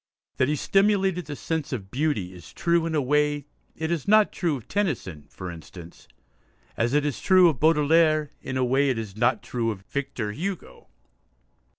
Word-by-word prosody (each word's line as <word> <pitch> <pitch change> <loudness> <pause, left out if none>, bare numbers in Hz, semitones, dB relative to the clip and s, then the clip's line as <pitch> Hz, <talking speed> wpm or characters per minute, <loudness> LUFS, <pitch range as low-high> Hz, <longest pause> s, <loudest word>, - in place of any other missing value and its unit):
That 130 - +2
he 150 - +1
stimulated 195 +1 +1
the 145 - -5
sense 160 0 -3
of 100 -7 -5
beauty 125 - -1
is 90 -2 -13
true 170 -1 +1
in 160 - -2
a 150 - +2
way 145 +1 +1 0.3
it 160 +1 -3
is 165 -5 -2
not 215 0 +5
true 170 -5 -1
of 120 - -14
Tennyson, 120 - -2
for 90 -1 -7
instance, 85 +1 -12 0.7
as 120 +4 0
it 150 0 +2
is 145 -4 -3
true 185 -2 +6
of 145 -7 -3
Baudelaire 155 -1 +3
in 130 - -4
a 130 - +2
way 135 +3 +2
it 130 - 0
is 110 -4 -6
not 120 +1 +1
true 115 -2 -2
of 105 -4 -5
Victor 135 -4 -4
Hugo. 180 - -6
145 Hz, 185 wpm, -25 LUFS, 115-165 Hz, 0.7 s, true